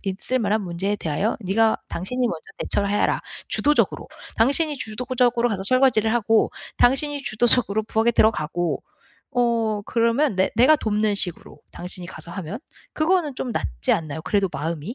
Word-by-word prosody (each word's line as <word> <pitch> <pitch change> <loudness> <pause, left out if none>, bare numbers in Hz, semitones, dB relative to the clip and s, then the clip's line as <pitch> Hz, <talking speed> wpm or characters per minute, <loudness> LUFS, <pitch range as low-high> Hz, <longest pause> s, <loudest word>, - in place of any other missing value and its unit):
있을 195 +7 -2
만한 215 -1 0
문제에 190 +3 -2
대하여 185 +7 -1
"니가 220 +4 +2
당신이 220 +9 -4
먼저 165 -8 -4 0.2
대처를 200 -1 -1
해라. 205 - +1 0.3
주도적으로. 295 0 +1 0.3
당신이 285 +6 +2
주도적으로 245 0 0
가서 195 -3 -3
설거지를 250 -4 +3
하고 225 -1 +2 0.3
당신이 285 +3 +2
주도적으로 225 -2 +2
부엌에 225 +1 +2
들어가고. 175 -6 +1 0.5
어 230 -4 +1
그러면 230 +1 +1
내 190 0 +2
내가 280 +6 +6
돕는 210 -3 0
식으로, 180 -4 -2
당신이 180 0 -5
가서 170 - -10
하면." 190 +4 -5 0.3
그거는 315 -3 +1
좀 255 - -4
낫지 - - -1
않나요? 160 -1 -4
그래도 200 +1 +1
마음이? 165 - -4
220 Hz, 370 characters per minute, -23 LUFS, 190-250 Hz, 0.5 s, 내가